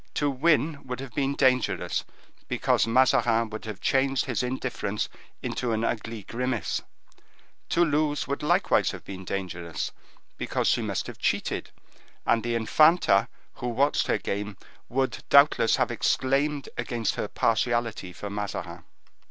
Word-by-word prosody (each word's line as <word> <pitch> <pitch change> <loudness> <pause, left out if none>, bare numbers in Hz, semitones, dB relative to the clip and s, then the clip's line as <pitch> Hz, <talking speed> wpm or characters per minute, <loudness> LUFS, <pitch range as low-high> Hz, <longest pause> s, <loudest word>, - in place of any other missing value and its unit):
To 145 -1 +1
win 150 +1 +2
would 125 0 -4
have 135 -3 -7
been 140 0 0
dangerous, 130 -3 +1 0.4
because - - +1
Mazarin 115 -2 +3
would 110 +1 -6
have 105 -3 -6
changed 135 0 +2
his 125 -6 -1
indifference 125 -5 -2 0.4
into 120 -2 -1
an 110 +1 0
ugly 115 -1 -3
grimace; 120 -1 -2 0.9
to 175 - +4
lose 150 -1 0
would 140 - -2
likewise 175 +6 +3
have - - -7
been 95 -1 -8
dangerous, 85 -5 -4 0.5
because - - -1
she - - +2
must - - -2
have - - -9
cheated, - - -1 0.6
and 115 - +3
the 120 0 -1
infanta, 115 - +4 0.3
who 125 - -5
watched 135 +5 +2
her - - +2
game, 100 0 -4 0.3
would, 130 -2 -1
doubtless, 140 -5 +6
have - - +1
exclaimed 140 +2 +1
against 120 -4 -1
her - - -3
partiality 115 -4 0
for 100 +3 -7
Mazarin. 95 -4 -5
120 Hz, 140 wpm, -27 LUFS, 110-140 Hz, 0.9 s, doubtless